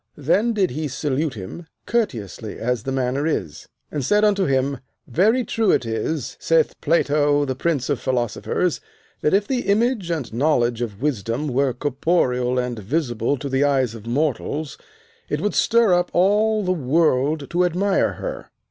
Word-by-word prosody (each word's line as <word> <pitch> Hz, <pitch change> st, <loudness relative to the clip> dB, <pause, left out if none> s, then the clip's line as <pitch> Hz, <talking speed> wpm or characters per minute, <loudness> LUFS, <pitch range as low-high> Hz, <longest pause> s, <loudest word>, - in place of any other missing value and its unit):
Then 190 Hz, -, +2 dB
did 195 Hz, -4 st, +1 dB
he 155 Hz, +4 st, -3 dB
salute 145 Hz, +1 st, -2 dB
him 110 Hz, -, -8 dB, 0.2 s
courteously 115 Hz, -, -2 dB
as 125 Hz, -1 st, -1 dB
the 135 Hz, -, -4 dB
manner 135 Hz, +3 st, 0 dB
is, 90 Hz, -, -3 dB, 0.2 s
and 145 Hz, -, -2 dB
said 210 Hz, +10 st, +3 dB
unto 200 Hz, -2 st, +2 dB
him, 135 Hz, 0 st, 0 dB, 0.3 s
Very 215 Hz, -, +2 dB
true 220 Hz, 0 st, 0 dB
it 120 Hz, -, +3 dB
is, 115 Hz, +4 st, -3 dB
saith 165 Hz, -1 st, +2 dB
Plato 145 Hz, -2 st, +2 dB
the 130 Hz, -, -2 dB
prince 140 Hz, 0 st, -1 dB
of 140 Hz, -, 0 dB
philosophers, 130 Hz, +7 st, -1 dB, 0.4 s
that 150 Hz, -, +3 dB
if 205 Hz, +1 st, +1 dB
the 255 Hz, -2 st, 0 dB
image 215 Hz, -2 st, +1 dB
and 150 Hz, -10 st, -3 dB
knowledge 120 Hz, -3 st, +1 dB
of 110 Hz, -1 st, -5 dB
wisdom 130 Hz, +1 st, -1 dB
were 135 Hz, +1 st, +1 dB
corporeal 130 Hz, -2 st, 0 dB
and 125 Hz, -2 st, -2 dB
visible 120 Hz, -, -1 dB
to 140 Hz, -, -5 dB
the 135 Hz, +1 st, +1 dB
eyes 135 Hz, -5 st, +2 dB
of 115 Hz, -1 st, -10 dB
mortals, 145 Hz, +2 st, -1 dB, 0.5 s
it 150 Hz, -, -1 dB
would 210 Hz, +5 st, -1 dB
stir 230 Hz, -4 st, +3 dB
up 175 Hz, 0 st, +2 dB
all 210 Hz, +4 st, +3 dB
the 185 Hz, -, 0 dB
world 150 Hz, -2 st, +1 dB
to 175 Hz, +1 st, +2 dB
admire 185 Hz, +3 st, +1 dB
her. -, -, -6 dB
145 Hz, 165 wpm, -22 LUFS, 125-175 Hz, 0.5 s, said